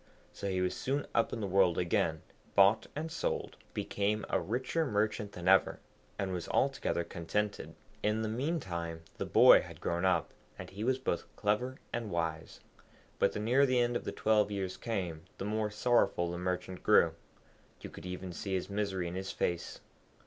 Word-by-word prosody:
So 100 - -4
he 95 -1 0
was 90 - 0
soon 140 +2 -1
up 115 - +2
in 115 - -4
the 100 - -1
world 95 -2 +3
again, 80 -2 0 0.3
bought 100 +2 +5
and 160 +2 -4
sold, - - -2 0.2
became 105 +1 -1
a - - +3
richer 130 +8 -1
merchant 105 -4 -1
than 90 0 -6
ever, 95 0 +4 0.4
and 95 -2 -2
was 90 -2 -4
altogether 135 -10 +1
contented. 100 +6 -3 0.3
In 105 +1 +1
the - - -1
meantime 95 - -3 0.2
the - - -2
boy - - +8
had - - -11
grown 85 +1 -1
up, 90 -4 +2 0.3
and - - -8
he 100 +3 -5
was 130 +2 +2
both 130 -10 -2
clever 110 +6 0 0.2
and 115 -2 -2
wise. 85 -3 -3 0.6
But - - +3
the - - -3
nearer 125 +6 +4
the 130 -1 +2
end 120 0 +1
of - - -2
the - - -2
twelve 105 -1 +2
years 95 -2 -3
came, 95 -7 -3 0.2
the - - -4
more 105 0 0
sorrowful 105 -5 +2
the 85 - -4
Merchant 90 0 -3
grew; 85 -6 +5 0.7
you - - -8
could - - -9
even 90 0 -5
see 95 +3 -3
his 95 +2 -3
misery 100 -3 -1
in 85 - -5
his 95 +1 -4
face. 85 -1 -2
100 Hz, 185 wpm, -32 LUFS, 90-110 Hz, 0.7 s, boy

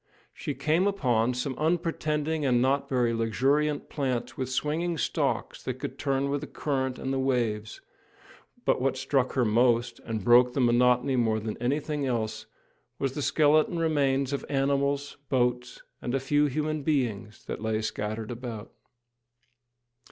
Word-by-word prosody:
She - - -5
came 165 +6 +2
upon 125 - +1
some 130 +2 -2
unpretending 155 -1 0
and 125 -3 +3
not 135 +3 +1
very 120 -3 +1
luxuriant 140 +6 +1
plants 130 -5 -2
with 130 -1 -3
swinging 160 +6 -1
stalks - - -1
that - - -3
could - - -7
turn 140 0 0
with 145 0 -1
the - - -6
current 130 -3 -2
and 135 - -3
the 135 - 0
waves; 115 -5 -1 0.8
but - - +2
what 130 0 +1
struck 130 -1 0
her 125 -3 +2
most, 120 +2 +2
and 110 -3 -4
broke 125 +2 +6
the - - -1
monotony 125 +2 +3
more 110 -2 +2
than 110 0 -4
anything 145 +3 -1
else, 110 -2 -2 0.5
was 135 -1 -1
the 145 - -3
skeleton 155 +3 +3
remains 140 -4 +1
of 140 - -2
animals, 140 +1 0
boats, 125 -1 0 0.2
and 125 +1 -2
a - - +2
few 145 +3 +2
human 155 +2 -2
beings, 120 -8 -2
that - - -5
lay 110 -1 0
scattered 110 +1 -3
about. 115 -3 -7
130 Hz, 150 wpm, -27 LUFS, 120-145 Hz, 0.8 s, broke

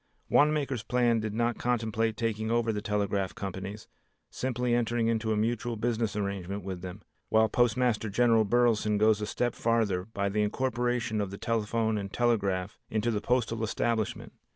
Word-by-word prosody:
Wanamaker's 145 -5 +2
plan 120 -1 +2
did 110 -1 -3
not 120 0 0
contemplate 115 -2 0
taking 110 -1 -1
over 115 -1 +1
the 105 - -3
telegraph 100 -2 -1
companies, 95 +2 -6 0.4
simply 125 -1 -1
entering 120 -1 +1
into 110 -1 0
a 110 - +1
mutual 115 +2 -1
business 115 -1 -1
arrangement 100 -1 -3
with 95 -2 -5
them, 95 +2 -8 0.3
while 110 0 +4
Postmaster 120 -1 +1
General 115 +1 +4
Burleson 110 -1 +2
goes 110 0 +3
a 105 - -2
step 120 +2 -1
farther 110 -6 0
by 100 -2 -2
the 105 +2 0
incorporation 120 -1 0
of 100 - -2
the 100 - -7
telephone 110 -1 0
and 100 -1 -6
telegraph 100 -5 0
into 110 +2 0
the 105 -2 -1
postal 115 -1 0
establishment. 110 0 -1
110 Hz, 160 wpm, -29 LUFS, 105-120 Hz, 0.4 s, while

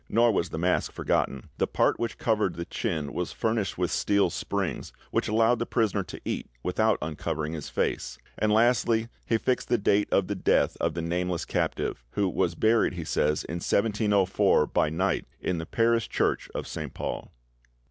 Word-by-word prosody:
Nor 120 +1 +4
was 90 -5 0
the - - -5
mask 90 +2 +1
forgotten: 70 -2 -1
"The - - +2
part - - +1
which 115 -1 -2
covered 105 -6 +1
the 85 - -4
chin 80 -11 -3
was 90 -1 -2
furnished 110 -4 -1
with 90 -2 0
steel 100 -4 +2
springs, - - -3 0.2
which - - 0
allowed 115 +2 +3
the 120 - -2
prisoner 105 -3 +1
to - - -8
eat - - -3
without 110 +4 +2
uncovering 75 0 -3
his 75 -3 -5
face." - - -2 0.2
And, 110 - +1
lastly, 115 0 +3 0.2
he 115 - +3
fixed 125 +2 0
the 120 - +3
date 105 -1 +2
of 100 - +3
the 100 - -2
death 95 - +2
of 85 -1 0
the 85 - -2
nameless 90 0 -1
captive; - - -2
who 100 -1 +1
"was 85 -1 0
buried," 110 +2 +3
he 90 -2 -5
says, 75 -1 +1
"in 85 - -4
1704., 100 -3 +2
by 75 - +1
night, 95 +5 0
in 90 -2 -1
the 80 - -6
parish 115 -1 +2
church - - 0
of - - -3
Saint 75 -4 -6
Paul." - - -4
100 Hz, 185 wpm, -27 LUFS, 85-110 Hz, 0.2 s, Nor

